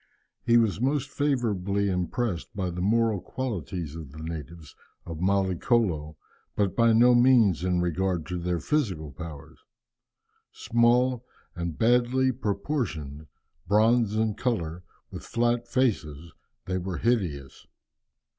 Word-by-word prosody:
He 120 - +4
was 110 -2 +1
most 140 +1 0
favourably 105 -9 0
impressed 95 +1 -2
by 95 -3 -2
the 90 +1 -5
moral 110 0 +2
qualities 90 - -5
of 80 -5 -8
the 80 +1 -9
natives 80 -1 -8 0.3
of 80 -2 -7
Mallicolo, 95 -4 +1 0.4
but 100 -3 0
by 115 -1 +4
no 120 +2 +6
means 120 -7 +5
so 90 - -2
in 90 -1 +1
regard 90 -1 -1
to 90 +2 -4
their 90 0 -1
physical 95 - -1
powers. 75 0 -10 0.9
Small 120 +1 +2 0.3
and 85 -3 -4
badly 125 +3 +3
proportioned, 100 - -3 0.4
bronze 110 +1 +3
in 110 -1 +1
colour, 90 -9 -2 0.3
with - - -7
flat 120 0 0
faces, 85 - -1 0.3
they 95 0 -2
were 90 -1 -4
hideous. 85 - -2
100 Hz, 125 wpm, -26 LUFS, 85-120 Hz, 0.9 s, no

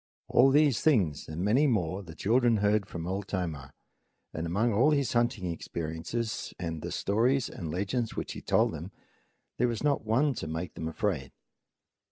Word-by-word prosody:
All 130 +2 +6
these 145 -3 +4
things 95 - +2
and 80 +3 -3
many 130 +9 +4
more 95 - 0
the 85 -4 -11
children 120 +3 +3
heard 105 -1 +2
from 85 -4 -6
Old 95 +2 -3
Tomah, 80 -8 -4 0.6
and 80 +1 -3
among 105 +7 +1
all 125 +9 +4
his 140 -5 +1
hunting 120 -5 +1
experiences 85 +8 -4
and 80 -3 -4
the - - -5
stories 120 +6 +1
and 85 - -6
legends 100 +7 -2
which - - -4
he - - -7
told - - +2
them - - -7 0.7
there 125 - +4
was 120 +1 -3
not 145 -2 +1
one 130 +7 +2
to 80 - -4
make 80 +2 -4
them 80 - -5
afraid. 80 -6 -2
105 Hz, 175 wpm, -29 LUFS, 85-120 Hz, 0.7 s, All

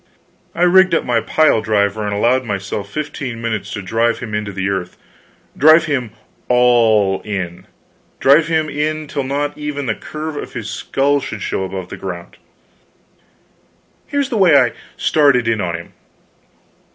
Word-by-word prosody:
I 175 - +1
rigged 185 0 +5
up - - +1
my 120 -2 +1
pile 155 -6 +3
driver, 105 -1 0
and 105 - -2
allowed 120 +6 +2
myself 100 -2 -4
fifteen 140 -3 -5
minutes 115 -3 -3
to 105 - -5
drive 115 +4 +1
him 115 -4 -7
into 105 -1 -2
the 95 0 -3
earth 95 -2 -3 0.6
drive 155 +3 +6
him 135 -6 -1 0.4
all 115 -5 +3
in 90 -3 -5 0.5
drive 150 +4 +5
him 160 -1 +1
in 155 +1 -2
till 140 - -3
not 145 +2 -2
even 145 -1 -4
the 115 - 0
curve 155 +5 -6
of - - -7
his 110 -2 -5
skull 140 +6 0
should 110 -6 -6
show 95 - -2
above 95 -1 -6
ground. 90 -3 -7 1.7
Here 285 - 0
is 275 - -2
the 235 - -1
way 170 -6 +6
I 125 -3 +2 0.2
started 140 -6 +3
in 115 -2 +1
on 85 -1 -2
him. 85 0 -9
120 Hz, 160 wpm, -18 LUFS, 100-150 Hz, 1.7 s, drive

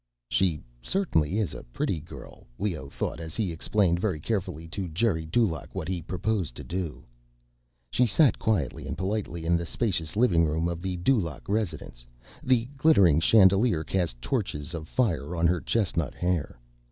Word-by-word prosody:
She 85 -5 +2 0.2
certainly 100 - +1
is 110 -4 0
a - - -7
pretty - - -2
girl, 75 - -12
Leoh 85 -9 -3
thought - - -3
as 80 -2 -7
he 100 -6 0
explained 85 +1 +1
very 95 -5 -1
carefully 90 -4 -3
to 95 +2 -4
Geri 80 -2 0
Dulaq 85 - 0
what - - -3
he 90 -2 -2
proposed 90 - -2
to - - -8
do. 90 -3 -4 0.9
She 125 - +3
sat 140 +5 +4
quietly 100 - -1
and - - -4
politely 95 -4 -2
in 85 +1 +3
the 85 - 0
spacious 90 -8 -1
living 100 -8 +4
room 80 +2 0
of 85 -1 -3
the 95 -1 -3
Dulaq 90 - 0
residence. 80 - -3 0.4
The 125 -3 +2
glittering 100 - +5
chandelier 95 -1 +5
cast 80 -7 -1
touches 75 +3 -2
of 80 -2 -5
fire 90 - 0
on 85 0 +1
her 85 0 +2
chestnut 85 - 0
hair. 90 -7 -1
90 Hz, 165 wpm, -27 LUFS, 80-105 Hz, 0.9 s, glittering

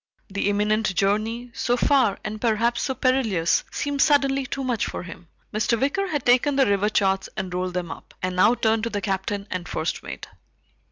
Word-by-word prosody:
The 200 +1 -1
imminent 210 -1 +1
journey, 220 +5 0
so 245 +1 0
far 250 -6 +3
and 215 0 -5
perhaps 235 +1 +1
so 265 - -1
perilous, 245 - +2
seemed 285 -1 -2
suddenly 275 -3 +3
too 275 - -4
much 245 -5 -1
for - - -5
him. 175 0 -11 0.3
Mr. 220 +2 +1
Wicker 335 +9 0
had 295 -7 -2
taken 255 +4 +4
the 270 -1 +4
river 200 +1 +2
charts 195 -2 +1
and 190 -2 -4
rolled 180 0 -2
them 175 -2 -3
up, - - -11
and 185 0 -2
now 210 +6 +5
turned 220 -1 +1
to - - -1
the 205 -2 -2
Captain 200 0 -2
and 180 -2 -4
first 160 +1 -2
mate. 65 0 -8
215 Hz, 190 wpm, -24 LUFS, 190-255 Hz, 0.3 s, now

